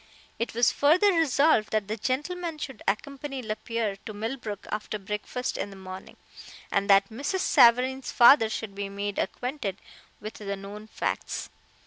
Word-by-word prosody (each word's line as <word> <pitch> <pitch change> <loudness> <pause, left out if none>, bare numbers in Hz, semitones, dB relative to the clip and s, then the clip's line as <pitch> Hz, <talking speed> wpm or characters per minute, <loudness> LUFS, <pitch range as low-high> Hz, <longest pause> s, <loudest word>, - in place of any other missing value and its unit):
It 230 -1 -3
was 235 0 +4
further 360 +8 +4
resolved 300 -7 +3
that 215 -2 +1
that 215 0 -4
gentleman 325 +5 -2
should 265 -7 -7
accompany 275 +5 -3
Lapierre 215 -1 -3
to 215 - -7
Millbrook 220 -2 -5
after 215 0 -3
breakfast 210 +5 -4
in - - -2
the 195 - -11
morning, 185 0 -10 0.5
and 200 0 0
that 195 0 +6
Mrs. 285 +11 -2
Savareen's 250 +2 +4
father 235 -2 +7
should 220 -2 -4
be 200 0 -4
made 200 0 -4
acquainted 245 -3 -3 0.4
with 215 +1 -7
the 200 -1 -5
known 200 +2 -9
facts. - - -3
220 Hz, 150 wpm, -27 LUFS, 205-270 Hz, 0.5 s, father